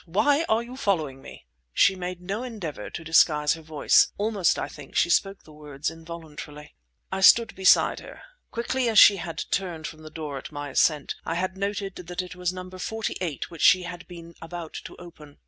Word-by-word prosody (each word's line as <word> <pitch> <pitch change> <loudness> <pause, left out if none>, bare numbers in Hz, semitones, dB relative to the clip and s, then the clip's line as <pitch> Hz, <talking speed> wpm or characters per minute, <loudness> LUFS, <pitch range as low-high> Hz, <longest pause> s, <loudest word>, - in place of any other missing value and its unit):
Why 280 - +2
are 220 +2 +2
you 250 +2 -10
following 155 - -1
me?" - - -12 0.3
She 195 - +4
made 180 -1 -5
no 195 +5 -4
endeavour 205 - -6
to 170 - -7
disguise 150 -2 +4
her 165 - -8
voice. 155 -2 +3
Almost, 205 -4 +1
I - - -2
think, 145 -2 -12
she 170 - +3
spoke 195 +2 +1
the 155 - -16
words 150 -1 -5
involuntarily. 160 -2 -10 0.4
I 190 0 -2
stood 230 +3 +6
beside 190 -1 +4
her. - - -12 0.3
Quickly 240 +1 -1
as 220 - 0
she 200 0 +9
had 170 -2 -5
turned 175 -5 -2
from 155 0 -8
the 155 - -10
door 150 -3 -6
at - - -10
my 145 -1 -6
ascent, 150 +2 +2
I 165 - -3
had 185 +2 -2
noted 200 0 -3
that 180 0 -5
it 180 0 -10
was 180 -1 -2
that 185 - -4
numbered 185 0 -8
forty 220 +3 -3
eight 170 -2 -4
which 165 - -9
she 185 0 +6
had 175 0 -8
been 170 -1 -11
about 165 -1 -7
to - - -9
open. 155 -5 -14
175 Hz, 205 wpm, -25 LUFS, 155-195 Hz, 0.4 s, she